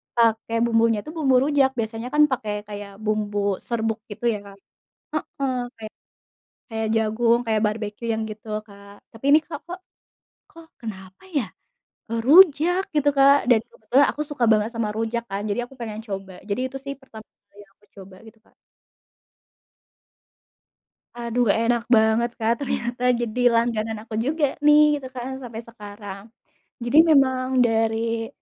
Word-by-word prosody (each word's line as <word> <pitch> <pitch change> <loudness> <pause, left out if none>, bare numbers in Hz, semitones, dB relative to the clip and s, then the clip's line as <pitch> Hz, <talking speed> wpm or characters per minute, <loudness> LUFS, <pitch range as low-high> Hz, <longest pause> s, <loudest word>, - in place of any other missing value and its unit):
pakai 230 -1 +2
bumbunya 225 -2 +2
itu 305 - -8
bumbu 270 -5 +3
rujak". 280 -2 +3
Biasanya 225 +2 -3
kan 300 0 +6
pakai 210 -4 -3
kayak 205 -1 -8
bumbu 210 -1 -1 0.3
serbuk 225 -1 -1
gitu 205 - -10
ya, 210 - -4
kan, 200 - -13 0.6
heeh. 270 -3 -4 0.2
Kayak 220 -1 -10 0.8
kayak 220 0 -1
jagung, 225 +2 +2
kayak 220 -1 +1
barbekyu, 210 +1 -6
yang 220 - -2
gitu, 215 +1 -10 0.2
Kak. 200 -1 -15 0.2
Tapi 225 +4 -11
ini, 300 +2 +7
Kak, 295 -3 -7
kok 355 +1 -7 0.7
kok 330 -1 -15
kenapa 190 - -9
ya, 235 -8 0 0.6
eee, 230 - -1
rujak, 350 +3 +6
gitu, 290 -1 +3
Kak, 275 +1 +7
dan 235 - +6
kebetulan 260 +6 +2
aku 300 - -5
suka 290 -4 -3
banget 215 +1 +3
sama 230 -2 -2
rujak 225 +1 -2
kan, 195 +1 -4
jadi 205 - -1
aku - - -17
pengen 220 -2 -5
coba. 195 -2 -6
Jadi 200 +5 -1
itu 270 - -5
sih 275 - -4
pertama 220 -4 -13 0.3
kali 205 0 -15
aku 205 - -29
coba, 190 0 -12
gitu, 225 0 -16
Kak. - - -31 2.6
Aduh, 240 0 0
enak 230 0 +1
banget, 220 +2 +3
Kak, 225 +1 +2
ternyata, 245 -2 -3 0.2
jadi 235 +1 -3
langganan 225 -2 0
aku 220 0 -8
juga 310 +1 +1 0.2
nih, 300 0 +7
gitu 270 -3 -6
kan, 255 +1 -5
sampai 230 -2 -7
sekarang. 205 -3 -9 0.6
Jadi 240 +5 +1
memang 260 -3 +3 0.2
dari 225 0 0
230 Hz, 150 wpm, -23 LUFS, 215-255 Hz, 2.6 s, ini